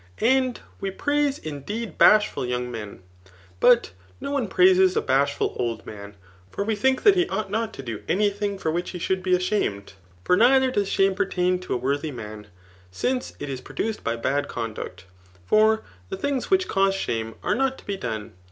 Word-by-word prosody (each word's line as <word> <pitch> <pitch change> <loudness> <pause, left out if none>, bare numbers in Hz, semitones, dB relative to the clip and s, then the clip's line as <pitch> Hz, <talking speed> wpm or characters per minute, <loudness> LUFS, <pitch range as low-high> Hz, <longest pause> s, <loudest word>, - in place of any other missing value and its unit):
And 255 +1 +2 0.2
we 195 - -2
praise 290 +6 0
indeed 160 +7 -6
bashful 210 -9 +5
young 125 0 -2
men; 105 -5 -8 0.6
but 240 - +5 0.3
no - - -5
one 275 -6 0
praises 185 0 +4
a - - +5
bashful 140 +2 +1
old 115 -2 -2
man* 100 -1 -9 0.3
For 200 - -3
we 220 +1 0
think 260 +5 +1
that 410 - +7
he 360 -1 +1
ought 215 -3 -3
not 220 +1 -1
to 135 - -8
do 115 -4 -5
any 205 +3 +2
thing 200 0 -3
for 160 -4 -1
which 175 +2 -2
he 180 - -6
should 185 +2 -1
be 185 0 +2
ashamed; 180 - -1 0.3
for 180 - +3
neither 260 +5 +5
does 205 -5 0
shame 195 0 +3
pertain 185 -2 0
to 180 - -3
a - - +1
worthy 140 +5 -1
man, 105 -4 -8 0.4
since 250 - -2
it 145 - -5
is 135 -2 -5
produced 210 - -4
by 115 - -1
bad 140 +5 -1
conduct 105 -5 -6 0.2
}. 90 0 -28
for 220 - +4 0.3
the - - -4
things 275 +3 -2
which 375 -1 +3
cause 195 0 +2
shame 115 -11 -3
are - - +1
not 265 0 0
to - - -16
be 200 - -2
done. 110 - -5
185 Hz, 195 wpm, -24 LUFS, -, 0.6 s, that